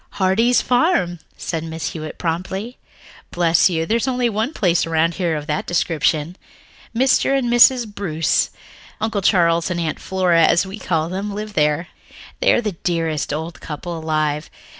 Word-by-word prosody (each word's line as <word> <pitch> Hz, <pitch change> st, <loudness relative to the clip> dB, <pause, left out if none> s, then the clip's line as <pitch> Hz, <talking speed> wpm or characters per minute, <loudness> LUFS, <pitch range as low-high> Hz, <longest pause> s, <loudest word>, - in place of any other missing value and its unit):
"Heartsease 225 Hz, +6 st, +2 dB
Farm," 245 Hz, -, +1 dB, 0.2 s
said 165 Hz, -2 st, -3 dB
Mrs. 160 Hz, 0 st, -4 dB
Hewitt 155 Hz, -1 st, -7 dB
promptly. 190 Hz, +7 st, -4 dB, 0.5 s
"Bless 170 Hz, 0 st, +3 dB
you, 165 Hz, -2 st, -1 dB
there's 230 Hz, +7 st, 0 dB
only 250 Hz, -2 st, +1 dB
one 220 Hz, +6 st, -1 dB
place 180 Hz, -, +1 dB
around 165 Hz, +1 st, +1 dB
here 170 Hz, -4 st, -1 dB
of 150 Hz, -1 st, -4 dB
that 150 Hz, -1 st, -3 dB
description. 165 Hz, 0 st, 0 dB, 0.6 s
Mr. 265 Hz, +2 st, +3 dB
and 240 Hz, -3 st, 0 dB
Mrs. 240 Hz, 0 st, +6 dB
Bruce, 195 Hz, -7 st, 0 dB, 0.5 s
Uncle 220 Hz, -2 st, -1 dB
Charles 170 Hz, -3 st, +3 dB
and 175 Hz, -1 st, -2 dB
Aunt 160 Hz, -3 st, -2 dB
Flora, 180 Hz, -3 st, +2 dB
as 170 Hz, +3 st, +4 dB
we 195 Hz, +3 st, -8 dB
all -, -, -12 dB
call 160 Hz, -2 st, 0 dB
them, 200 Hz, +3 st, -4 dB
live 210 Hz, 0 st, -6 dB
there. 150 Hz, +2 st, +1 dB, 0.5 s
They -, -, +4 dB
are -, -, +3 dB
the 215 Hz, -3 st, -2 dB
dearest 165 Hz, -4 st, -2 dB
old 160 Hz, +3 st, -5 dB
couple 170 Hz, +3 st, -6 dB
alive. 155 Hz, -2 st, -1 dB
175 Hz, 160 wpm, -20 LUFS, 160-210 Hz, 0.6 s, Mrs